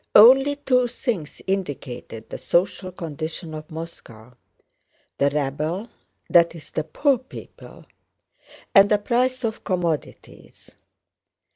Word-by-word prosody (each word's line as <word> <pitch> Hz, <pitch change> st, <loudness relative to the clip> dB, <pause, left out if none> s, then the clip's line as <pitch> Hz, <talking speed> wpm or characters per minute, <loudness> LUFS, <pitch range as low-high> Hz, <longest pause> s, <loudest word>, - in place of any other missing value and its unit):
Only 270 Hz, +6 st, +8 dB
two 255 Hz, -3 st, +2 dB
things 230 Hz, -, -4 dB
indicated 145 Hz, -, -4 dB
the -, -, -7 dB
social 185 Hz, +1 st, 0 dB
condition 160 Hz, 0 st, -6 dB
of 155 Hz, 0 st, -8 dB
Moscow—the 135 Hz, -3 st, -7 dB
rabble, 150 Hz, -, -2 dB, 0.4 s
that 170 Hz, -1 st, +4 dB
is 160 Hz, -, -11 dB
the 155 Hz, -, -1 dB
poor 265 Hz, -, +1 dB
people, 260 Hz, -, -12 dB, 0.9 s
and 200 Hz, -1 st, +7 dB
the 210 Hz, -, +4 dB
price 255 Hz, +4 st, 0 dB
of 225 Hz, -1 st, -3 dB
commodities. 175 Hz, -6 st, -4 dB
175 Hz, 105 wpm, -23 LUFS, 155-235 Hz, 0.9 s, Only